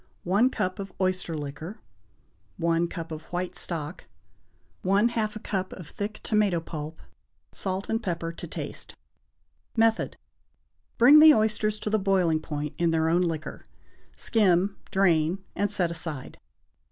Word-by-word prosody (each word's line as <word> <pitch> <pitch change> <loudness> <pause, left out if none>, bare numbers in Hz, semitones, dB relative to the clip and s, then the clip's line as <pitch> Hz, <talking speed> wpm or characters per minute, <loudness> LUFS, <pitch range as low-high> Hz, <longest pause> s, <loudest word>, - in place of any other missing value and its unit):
1 205 +8 +3
cup 185 -6 -2
of 195 -1 -5
oyster 185 -3 0
liquor. 150 +7 -6 0.8
1 170 0 +1
cup 165 -1 -7
of 155 0 -5
white 180 +1 -4
stock. 160 -1 -6 0.8
1/2 215 +3 +2
a - - -5
cup 190 -3 -3
of 175 -5 -9
thick 210 +1 -5
tomato 210 -5 +2
pulp. 160 -1 -7 0.5
Salt 190 0 -3
and 225 +1 0
pepper 170 -5 -2
to 170 - -8
taste. - - -6 0.8
Method. 225 0 +2 0.8
Bring 265 +6 +8
the 310 0 +9
oysters 215 -1 +1
to 210 0 -4
the 215 - +3
boiling 185 -5 +2
point 150 -1 -4
in 170 -1 +3
their 160 0 +2
own 175 +2 +3
liquor, 165 -3 -3 0.5
skim, 195 -3 +2
drain, 180 -1 +2
and 205 0 +1
set 180 -5 +1
aside. 160 -5 -5
185 Hz, 140 wpm, -27 LUFS, 165-210 Hz, 0.8 s, the